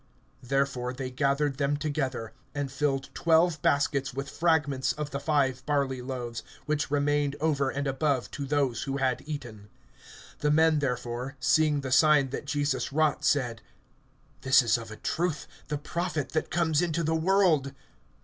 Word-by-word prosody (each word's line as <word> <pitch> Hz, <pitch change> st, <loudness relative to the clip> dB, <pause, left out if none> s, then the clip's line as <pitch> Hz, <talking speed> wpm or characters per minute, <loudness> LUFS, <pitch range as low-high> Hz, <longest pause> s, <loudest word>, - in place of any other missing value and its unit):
(13)Therefore 130 Hz, -1 st, -1 dB
they 130 Hz, -1 st, -4 dB
gathered 140 Hz, +1 st, 0 dB
them 145 Hz, +1 st, +1 dB
together, 135 Hz, -6 st, -3 dB, 0.2 s
and 140 Hz, -2 st, -2 dB
filled 135 Hz, -1 st, -1 dB
twelve 165 Hz, -1 st, +3 dB
baskets 140 Hz, -2 st, +1 dB
with 140 Hz, +1 st, -4 dB
fragments 150 Hz, -5 st, +1 dB
of 150 Hz, -1 st, -5 dB
the 140 Hz, -, -3 dB
five 140 Hz, -3 st, +1 dB
barley 140 Hz, -3 st, 0 dB
loaves, 125 Hz, -2 st, -5 dB, 0.2 s
which 150 Hz, -2 st, -1 dB
remained 145 Hz, 0 st, +1 dB
over 145 Hz, -3 st, +1 dB
and 140 Hz, +1 st, -3 dB
above 135 Hz, -1 st, 0 dB
to 145 Hz, -, -5 dB
those 135 Hz, -5 st, 0 dB
who 135 Hz, -, -1 dB
had 130 Hz, -3 st, 0 dB
eaten. 120 Hz, -9 st, -7 dB, 0.7 s
(14)The 150 Hz, 0 st, +2 dB
men 160 Hz, -1 st, +4 dB
therefore, 125 Hz, -1 st, -3 dB
seeing 150 Hz, +1 st, +3 dB
the 130 Hz, -1 st, -5 dB
sign 145 Hz, 0 st, +5 dB
that 140 Hz, -, -5 dB
Jesus 145 Hz, -3 st, -1 dB
wrought, 150 Hz, 0 st, +1 dB
said: 125 Hz, -7 st, +1 dB, 0.8 s
This 130 Hz, 0 st, +5 dB
is 115 Hz, -1 st, +3 dB
of 115 Hz, -2 st, -5 dB
a 110 Hz, -, -8 dB
truth 170 Hz, -2 st, -2 dB, 0.2 s
the 150 Hz, -, -2 dB
Prophet 155 Hz, 0 st, -3 dB
that 155 Hz, -, -2 dB
comes 160 Hz, -2 st, +1 dB
into 170 Hz, -1 st, 0 dB
the 160 Hz, +1 st, 0 dB
world. 160 Hz, -4 st, +3 dB
140 Hz, 160 wpm, -28 LUFS, 130-150 Hz, 0.8 s, sign